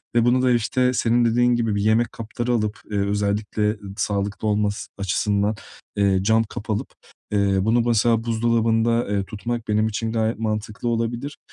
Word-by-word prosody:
ve 120 -1 +4
bunu 125 +1 +3
da, 130 -1 +3
işte, 125 +2 +1
senin 120 0 +2
dediğin 120 +1 +3
gibi 115 -3 0
bir 100 - 0
yemek 110 +3 +2
kapları 120 +2 -4
alıp, 110 -2 0
eee, 105 - -1
özellikle 105 +1 0 0.2
sağlıklı 100 +1 -2
olması 105 -1 0
açısından, 100 +2 0 0.4
eee, 100 -2 +2
cam 110 +2 +3
kap 105 0 -9
alıp, 105 - -1 0.4
eee, 100 -1 +2
bunu 115 +4 +3
mesela 115 0 +2
buzdolabında, 115 0 +1
eee, 100 -1 0
tutmak 115 +3 -5
benim 110 +1 +2
için 110 +1 -2
gayet 110 0 -1
mantıklı 110 +1 -3
olabilir, 120 +5 -2
110 Hz, 160 wpm, -22 LUFS, 105-115 Hz, 0.4 s, ve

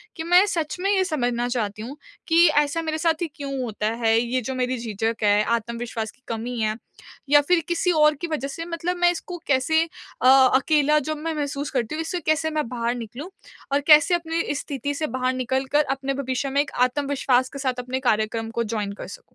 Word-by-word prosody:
कि 320 - -5
मैं 355 +4 +5
सच 330 -4 -2
में 395 +2 +1
ये 380 - +3
समझना 245 -7 -1
चाहती 215 -4 -2
हूँ 270 +6 -7 0.3
कि 335 +1 +5
ऐसा 295 +3 +2
मेरे 315 -1 -2
साथ 325 0 0
ही 340 - 0
क्यों 275 -2 -5
होता 215 -2 -3
है? 225 0 +2
ये 245 +2 -1
जो 265 +3 -4
मेरी 255 0 -1
झिझक 225 -1 -3
है, 205 0 +4
आत्मविश्वास 235 -1 -3
की 255 - -33
कमी 230 +1 -4
है 215 0 0 0.5
या 290 0 +7
फ़िर 350 +4 +2
किसी 350 +1 +1
और 300 -2 +4
की 340 - -2
वज़ह 300 -4 -3
से 330 +4 -6
मतलब 345 +1 -3
मैं 350 0 +4
इसको 355 +1 -6
कैसे 285 +4 +3 0.4
अ, 255 - +4
अकेला 275 +3 +5
जब 310 -1 -2
मैं 325 +1 -3
महसूस 285 -1 -3
करती 250 +2 -2
हूँ 320 - -2
इससे 350 +2 -3
कैसे 315 +1 +1
मैं 305 -5 -1
बाहर 235 0 -2
निकलूँ? 245 - -7 0.4
और 285 - +4
कैसे 305 +4 +7
अपनी 330 -2 -2
स्थिति 285 0 -4
से 310 +1 -2
बाहर 255 0 0
निकल 260 +1 -1
कर 300 +1 +5
अपने 275 0 -3
भविष्य 265 0 -2
में 280 +2 +2
एक 295 - -5
आत्मविश्वास 260 -1 0
के 275 - -6
साथ 255 -2 -2
अपने 255 +1 -3
कार्यक्रम 220 +1 -1
को 235 +1 -1
जॉइन 210 -2 -3
कर - - -9
सकूँ। - - -10
275 Hz, 215 wpm, -23 LUFS, 240-315 Hz, 0.5 s, या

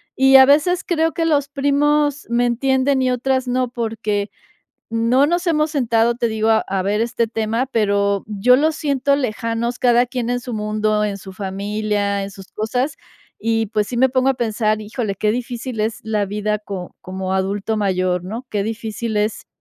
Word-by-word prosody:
y 270 0 +7
a 265 - +9
veces 310 +6 +3
creo 325 -2 0
que 330 - -1
los 290 -3 +1
primos 290 +1 +1
me 240 +1 +2
entienden 265 +2 +1
y 255 - +2
otras 260 +1 0
no, 250 0 0
porque 220 -3 -2 0.6
no 230 +5 +3
nos 345 +3 0
hemos 310 -2 +2
sentado, 235 -5 +2
te 235 0 -1
digo, 220 0 0 0.2
a 190 -1 -1
ver 205 +3 0
este 235 0 0
tema, 225 +2 -1
pero, 200 -4 +1
yo 215 +4 +4
los 310 +3 +1
siento 280 -2 +1
lejanos 235 -2 -2
cada 245 -1 +4
quien 245 -1 -3
en 245 0 0
su 245 0 -7
mundo, 215 0 0
en 205 -1 -1
su 190 0 -10
familia, 200 +1 -2
en 195 - -5
sus 195 -1 -13
cosas, 250 +7 -2 0.4
y 225 0 0
pues, 210 0 -1
sí 245 - -4
me 260 +2 +4
pongo 255 +1 +1
a - - 0
pensar 220 -3 0
híjole 215 -1 -3
qué 210 +2 0
difícil 245 0 -4
es 220 +1 -2
la 215 -2 0
vida 210 +1 -1
co 195 -4 -7
como 185 0 -4
adulto 195 +3 -1
mayor, 185 -3 0
¿no?, 225 +7 -6
qué 205 -2 -1
difícil 225 0 -4
es 215 +1 -1
230 Hz, 185 wpm, -20 LUFS, 210-260 Hz, 0.6 s, a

